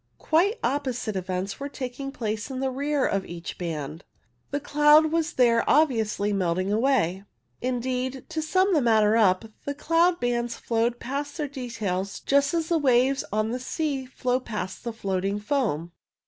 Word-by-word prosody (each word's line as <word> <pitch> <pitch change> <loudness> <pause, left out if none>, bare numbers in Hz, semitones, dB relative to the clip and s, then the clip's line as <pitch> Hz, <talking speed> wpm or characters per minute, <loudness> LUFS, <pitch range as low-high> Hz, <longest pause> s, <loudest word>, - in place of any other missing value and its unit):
Quite 390 +9 +2
oppo 265 0 0
site 220 -4 -4
events 185 +1 -3
were 280 +1 -4
taking 275 0 -5
place 220 -3 -3
in 260 -1 -4
the 265 0 0
rear 285 +1 0
of 195 -1 0
each 170 -1 -8
band. 160 -2 -4 0.5
The 285 - -1
cloud 295 +2 +5
was 330 0 0
there 235 -2 +4
obviously 225 -8 +2
melting 185 +1 0
away. 215 -6 +1 0.4
Indeed, 255 +1 -2
to 315 - -2
sum 370 +5 +2
the 305 - +4
matter 220 -3 +4
up, 195 -3 +3 0.2
the 285 - -3
cloud 335 +4 +2
bands 240 -1 -1
flowed 235 +1 0
past 285 +4 -4
their 300 -3 -2
details 220 -8 -4
just 280 +3 +2
as 325 -1 0
the 335 -2 +3
waves 265 0 +3
on 215 +2 0
the 250 - -2
sea 270 0 -2
flow 255 0 -1
past 205 -7 -5
the 235 - -3
floating 195 -2 -2
foam. 210 - -1
250 Hz, 165 wpm, -26 LUFS, 210-285 Hz, 0.5 s, cloud